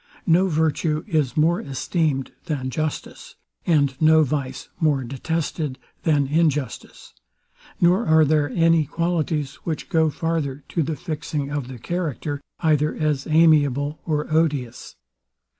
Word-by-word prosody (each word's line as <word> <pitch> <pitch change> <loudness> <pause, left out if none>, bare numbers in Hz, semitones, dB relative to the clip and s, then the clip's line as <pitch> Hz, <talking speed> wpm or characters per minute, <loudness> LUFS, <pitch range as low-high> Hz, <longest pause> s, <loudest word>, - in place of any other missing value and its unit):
No 180 +2 +4
virtue 155 -1 0
is 155 - 0
more 165 +3 +3
esteemed 140 0 -1
than 135 -6 -3
justice, 155 +2 -4 0.3
and 140 -5 +3
no 160 0 +6
vice 130 -2 -3
more 150 -5 +2
detested 145 +2 -3 0.2
than 150 -4 +2
injustice; 150 -4 -1 0.7
nor 180 +6 +3
are 160 0 +5
there 150 0 +2
any 165 +1 +3
qualities, 155 -3 -1
which 160 -1 -5
go 160 -4 +3
farther 150 -3 -2
to 170 - 0
the 155 +1 -1
fixing 150 -4 -4
the 130 -3 -4
character, 150 -1 -3 0.2
either 150 -2 +2
as 150 -3 -1
amiable 150 -3 +3
or 150 -2 -1
odious. 150 -7 -1
155 Hz, 125 wpm, -23 LUFS, 140-165 Hz, 0.7 s, no